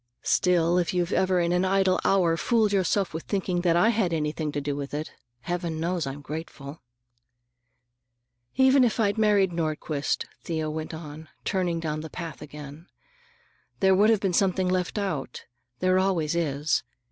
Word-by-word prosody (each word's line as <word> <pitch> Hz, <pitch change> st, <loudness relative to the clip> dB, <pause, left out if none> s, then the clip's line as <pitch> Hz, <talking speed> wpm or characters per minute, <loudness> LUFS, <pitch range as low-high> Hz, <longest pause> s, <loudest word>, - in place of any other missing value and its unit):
Still, 175 Hz, -1 st, +3 dB
if 175 Hz, +1 st, -1 dB
you've 175 Hz, -1 st, 0 dB
ever 185 Hz, -1 st, +2 dB
in 170 Hz, 0 st, +1 dB
an 180 Hz, +1 st, +2 dB
idle 190 Hz, 0 st, +2 dB
hour 175 Hz, -4 st, +3 dB
fooled 220 Hz, +3 st, +1 dB
yourself 190 Hz, -1 st, +1 dB
with 160 Hz, -, -4 dB
thinking 185 Hz, -3 st, -1 dB
I 175 Hz, +6 st, +4 dB
had 205 Hz, -7 st, +1 dB
anything 150 Hz, -1 st, -2 dB
to 145 Hz, -, -2 dB
do 145 Hz, 0 st, -3 dB
with 140 Hz, 0 st, -5 dB
it, 155 Hz, +1 st, -4 dB, 0.3 s
Heaven 175 Hz, 0 st, -3 dB
knows 170 Hz, -2 st, -1 dB
I'm 135 Hz, +2 st, -6 dB
grateful." 150 Hz, -2 st, -7 dB, 1.7 s
"Even 265 Hz, 0 st, +5 dB
if 235 Hz, -1 st, +1 dB
I'd 210 Hz, 0 st, +1 dB
married 205 Hz, -3 st, +3 dB
Nordquist," 155 Hz, -3 st, -2 dB, 0.2 s
Thea 160 Hz, -2 st, -2 dB
went 160 Hz, +1 st, -5 dB
on, 155 Hz, -1 st, -9 dB, 0.2 s
turning 180 Hz, -3 st, 0 dB
down 155 Hz, -2 st, -3 dB
the 160 Hz, -, -7 dB
path 165 Hz, -2 st, -7 dB
again, 150 Hz, +2 st, -10 dB, 0.9 s
"there 190 Hz, -1 st, +4 dB
would 205 Hz, +3 st, +4 dB
have 220 Hz, -3 st, +3 dB
been 190 Hz, -3 st, 0 dB
something 185 Hz, 0 st, +2 dB
left 180 Hz, +2 st, -1 dB
out. 190 Hz, -9 st, -3 dB, 0.4 s
There 185 Hz, 0 st, +3 dB
always 175 Hz, -5 st, +1 dB
is. 150 Hz, -3 st, 0 dB
175 Hz, 160 wpm, -26 LUFS, 155-190 Hz, 1.7 s, Even